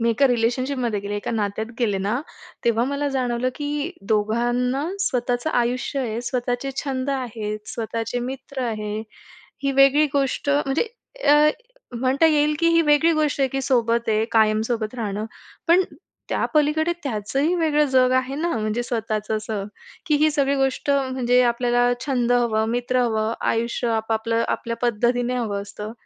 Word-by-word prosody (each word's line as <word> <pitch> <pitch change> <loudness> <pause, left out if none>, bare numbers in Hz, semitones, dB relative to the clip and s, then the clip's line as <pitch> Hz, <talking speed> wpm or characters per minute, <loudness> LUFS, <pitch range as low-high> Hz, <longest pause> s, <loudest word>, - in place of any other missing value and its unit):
मी 230 0 +2
एका 275 +5 +3
रिलेशनशिपमध्ये 245 -1 0
गेले, 205 +1 -4
एका 205 - -4
नात्यात 215 -1 -2
गेले 210 -6 +1
ना, 210 +7 -1 0.4
तेव्हा 235 0 +2
मला 280 +2 -1
जाणवलं, 255 -2 0
की 295 +2 -3 0.2
दोघांना 240 +5 +1 0.2
स्वतःचं 250 -4 0
आयुष्य 250 +2 0
आहे, 230 -2 -2
स्वतःचे 245 +2 -2
छंद 270 -1 -2
आहेत, 225 -5 -3
स्वतःचे 230 +1 -3
मित्र 265 +1 -5
आहे. 215 -3 -3 0.6
ही 275 -1 +1
वेगळी 275 +3 +5
गोष्ट 280 +1 0
म्हणजे 285 0 +1 0.5
अ, 295 +1 +6 0.5
म्हणता 265 +5 +3
येईल 300 -1 +3
की 335 - +4
ही 335 0 +5
वेगळी 300 +2 +4
गोष्ट 305 -2 0
आहे, 270 - +3
की 270 +1 -3
सोबत 235 -3 +1
आहे 215 0 +2
कायम 215 -1 +4
सोबत 225 -1 -2
राहणं, 210 -2 -3 0.4
पण 355 +3 +6 0.5
त्यापलीकडे 310 +2 +1
त्याचंही 275 - -1
वेगळं 300 -3 +2
जग 255 -1 +4
आहे 260 +1 -1
ना, 330 +4 -1
म्हणजे 215 +2 -1
स्वतःचं 220 -2 -2
असं 215 -2 -4 0.4
की 305 - +2
ही 310 +1 +3
सगळी 280 -2 +1
गोष्ट 270 +1 0
म्हणजे 260 -3 +2
आपल्याला 245 0 +2
छंद 245 -3 +1
हवं, 225 -3 +2
मित्र 245 +1 0
हवं, 220 -1 0
आयुष्य 235 +1 0
आपापलं 225 +1 0
आपल्या 230 -1 -2
पद्धतीने 245 +1 +1
हवं 205 -5 -2
असतं. 210 +2 -8
245 Hz, 150 wpm, -23 LUFS, 225-275 Hz, 0.6 s, अ